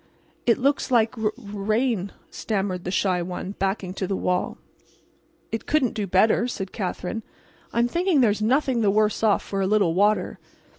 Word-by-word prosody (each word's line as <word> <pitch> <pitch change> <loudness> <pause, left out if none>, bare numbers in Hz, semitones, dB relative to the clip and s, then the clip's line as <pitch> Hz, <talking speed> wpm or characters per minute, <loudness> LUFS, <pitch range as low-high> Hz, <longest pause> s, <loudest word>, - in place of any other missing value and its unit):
"It 235 - +5
looks 280 +3 +1
like 235 -1 +3
r 220 -2 0
rain," 215 -1 -1 0.2
stammered 195 -4 -2
the - - -2
shy 185 -1 +1
one, 180 +2 -5
backing 190 -1 -1
to 190 -1 -3
the 195 - -1
wall. 180 0 -1 0.9
"It 225 - -4
couldn't 285 -6 +2
do 205 -2 -3
better," 215 +6 +3
said 195 -6 -5
Katherine. 195 +1 -4 0.5
"I'm 235 +1 +2
thinking 345 +3 +1
there's 215 -4 +3
nothing 255 +1 +2
the 210 - +3
worse 210 +1 +2
off 215 -3 +3
for 195 -1 -3
a 190 - +1
little 200 -5 +3
water." 205 +4 +1
210 Hz, 165 wpm, -24 LUFS, 195-235 Hz, 0.9 s, It